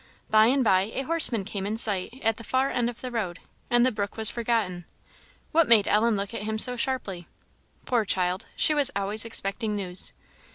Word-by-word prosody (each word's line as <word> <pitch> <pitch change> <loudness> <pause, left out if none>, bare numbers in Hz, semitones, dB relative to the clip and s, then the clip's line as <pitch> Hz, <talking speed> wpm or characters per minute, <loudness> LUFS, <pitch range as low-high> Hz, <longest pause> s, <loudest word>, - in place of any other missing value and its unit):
By 215 0 +5
and 265 +2 +2
by 190 -2 +2
a 270 - -2
horseman 260 -9 +3
came 200 -1 -5
in 215 +2 -3
sight 215 +2 +2
at 225 -1 0
the 230 - -10
far 260 +4 -1
end 240 -1 -1
of 240 - -11
the 255 - -6
road, 200 -7 -4 0.3
and 240 0 +3
the 255 - +1
brook 205 -1 -5
was 220 -1 +6
forgotten. 220 -7 -3 0.7
What 330 -1 +2
made 220 -4 +5
Ellen 220 +2 +2
look 200 +2 -5
at 230 - -5
him 220 +1 -4
so 250 +3 +4
sharply? 230 -9 -3 0.6
Poor 240 -3 0
child! 185 -2 -1
she 310 - +4
was 290 -2 +3
always 200 +3 -1
expecting 210 -1 -2
news. 185 -2 -3
220 Hz, 200 wpm, -25 LUFS, 200-245 Hz, 0.7 s, was